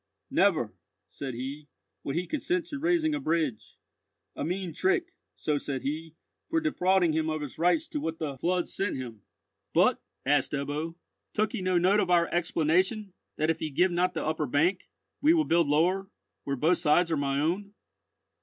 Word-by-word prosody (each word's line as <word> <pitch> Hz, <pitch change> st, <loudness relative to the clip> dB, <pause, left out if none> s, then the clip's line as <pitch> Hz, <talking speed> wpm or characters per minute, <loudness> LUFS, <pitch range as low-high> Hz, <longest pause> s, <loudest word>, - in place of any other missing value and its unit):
'Never,' -, -, +2 dB, 0.4 s
said 135 Hz, -3 st, -6 dB
he, 140 Hz, +4 st, -6 dB, 0.4 s
'would 140 Hz, -, -3 dB
he 175 Hz, +2 st, 0 dB
consent 335 Hz, -, -1 dB
to 290 Hz, -, -6 dB
raising 325 Hz, 0 st, +2 dB
a 300 Hz, -, -1 dB
bridge—a 155 Hz, -, -4 dB
mean 180 Hz, 0 st, -3 dB
trick,' 380 Hz, -, +1 dB, 0.2 s
so 150 Hz, -1 st, -1 dB
said 135 Hz, -3 st, -4 dB
he, 155 Hz, +3 st, -4 dB, 0.3 s
'for 325 Hz, 0 st, +2 dB
defrauding 190 Hz, -, +2 dB
him 160 Hz, 0 st, 0 dB
of 155 Hz, -1 st, -2 dB
his 145 Hz, 0 st, -7 dB
rights 180 Hz, -, +2 dB
to 300 Hz, -, -3 dB
what 165 Hz, -, -3 dB
the 150 Hz, -4 st, -3 dB
flood 180 Hz, +3 st, 0 dB
sent 195 Hz, 0 st, -2 dB
him.'" 120 Hz, -5 st, -7 dB, 0.5 s
"But," -, -, +4 dB, 0.2 s
asked 140 Hz, 0 st, +2 dB
Ebbo, 145 Hz, +4 st, -3 dB, 0.4 s
"took 215 Hz, 0 st, +1 dB
he -, -, -3 dB
no 185 Hz, -1 st, +2 dB
note 185 Hz, +4 st, +4 dB
of 185 Hz, -, +1 dB
our 175 Hz, -1 st, +5 dB
explanation, 175 Hz, +5 st, +1 dB, 0.2 s
that 155 Hz, +1 st, +2 dB
if 165 Hz, -, -4 dB
he 155 Hz, -, -2 dB
give 175 Hz, +6 st, +2 dB
not 180 Hz, +1 st, +1 dB
the -, -, -2 dB
upper 155 Hz, -1 st, -1 dB
bank, 170 Hz, +8 st, +1 dB, 0.3 s
we 310 Hz, +4 st, +5 dB
will 315 Hz, -2 st, +3 dB
build 170 Hz, -1 st, +3 dB
lower, 180 Hz, +6 st, +2 dB, 0.4 s
where 140 Hz, -, -1 dB
both 160 Hz, +7 st, +2 dB
sides 165 Hz, +3 st, +3 dB
are 160 Hz, -, +2 dB
my 140 Hz, -1 st, 0 dB
own?" 195 Hz, +7 st, -1 dB
170 Hz, 180 wpm, -28 LUFS, 150-195 Hz, 0.5 s, our